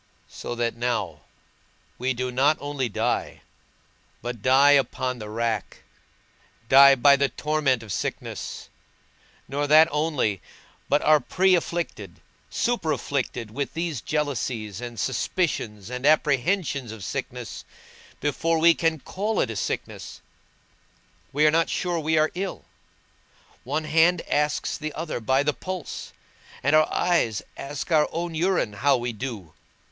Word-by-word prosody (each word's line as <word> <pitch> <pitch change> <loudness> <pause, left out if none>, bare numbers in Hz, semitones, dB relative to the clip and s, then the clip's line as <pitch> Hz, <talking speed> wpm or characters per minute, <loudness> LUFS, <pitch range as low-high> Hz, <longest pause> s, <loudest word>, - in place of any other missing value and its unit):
So 120 - -6
that 120 -1 -1
now, 105 -10 -2 0.8
we 130 +1 0
do 125 +1 -2
not 140 +5 +3
only 145 -3 -3
die, 100 - -2 0.8
but 120 -2 -5
die 135 +4 +5
upon 130 -3 +1
the 105 -1 -7
rack, 115 -2 -3 0.8
die 135 +2 +8
by 140 +2 +6
the 140 0 +1
torment 150 -6 0
of 105 -3 -6
sickness; - - -5 0.8
nor 145 +2 -2
that 155 +2 +7
only, 145 - 0 0.5
but 145 - +2
are 155 0 +6
pre 190 +5 +2
afflicted, 170 -1 -2 0.3
super 235 -10 0
afflicted 125 -7 -3
with 140 +5 -4
these 165 -7 -2
jealousies 125 - -2
and 120 -2 -7
suspicions 120 - -2
and 125 0 -5
apprehensions 150 - +2
of 110 -3 -9
sickness, - - -5 0.6
before 160 +3 0
we 165 +1 +6
can 165 -1 0
call 210 +9 -2
it 115 - +1
a - - -6
sickness: - - -4 1.1
we 150 +2 +2
are 155 - +6
not 165 +1 +2
sure 175 -2 -1
we 160 +1 +1
are 155 0 +3
ill; 190 +1 -5 1.0
one 150 +5 -2
hand 165 +3 +3
asks 150 +2 0
the 155 -1 -4
other 160 -5 -4
by 130 +4 +2
the 150 0 +1
pulse, 185 0 -6 0.5
and 145 +3 +3
our 155 0 +4
eye 175 -10 +2 0.2
asks 145 +4 -6
our 155 -2 +4
own 170 0 -3
urine 170 - 0
how 140 +7 +2
we 120 0 -3
do. 105 - -6
145 Hz, 140 wpm, -25 LUFS, 120-160 Hz, 1.1 s, die